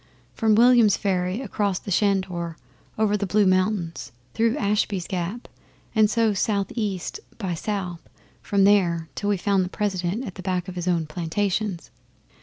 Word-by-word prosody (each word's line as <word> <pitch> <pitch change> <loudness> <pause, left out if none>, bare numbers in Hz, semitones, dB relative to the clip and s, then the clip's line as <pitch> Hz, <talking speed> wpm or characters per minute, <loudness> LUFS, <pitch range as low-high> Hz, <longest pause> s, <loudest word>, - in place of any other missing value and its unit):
From 220 -1 +2
Williams 235 -2 +6
Ferry, 185 +2 -1
across 205 -7 -1
the 200 - -7
Shanedore, 185 -4 0 0.4
over 215 -1 +2
the 200 -1 -1
Blue 205 +2 +3
Mountains, 185 - 0 0.2
through 230 +4 +1
Ashby's 200 -4 0
Gap, 185 +6 -4 0.5
and 215 -2 +4
so 225 -1 +2
south 200 0 0
east 205 - -3 0.2
by 190 -6 -3
south 180 -1 -3 0.4
from 200 -1 +1
there, 175 -5 +3
till 205 - -2
we 205 - +2
found 195 0 +1
the 180 - -4
President 195 +3 -2
at 195 - -6
the 185 - -9
back 180 -1 -2
of 185 - -6
his 175 0 -4
own 170 -3 +1
plantations. 180 +4 -2
195 Hz, 160 wpm, -24 LUFS, 180-210 Hz, 0.5 s, Williams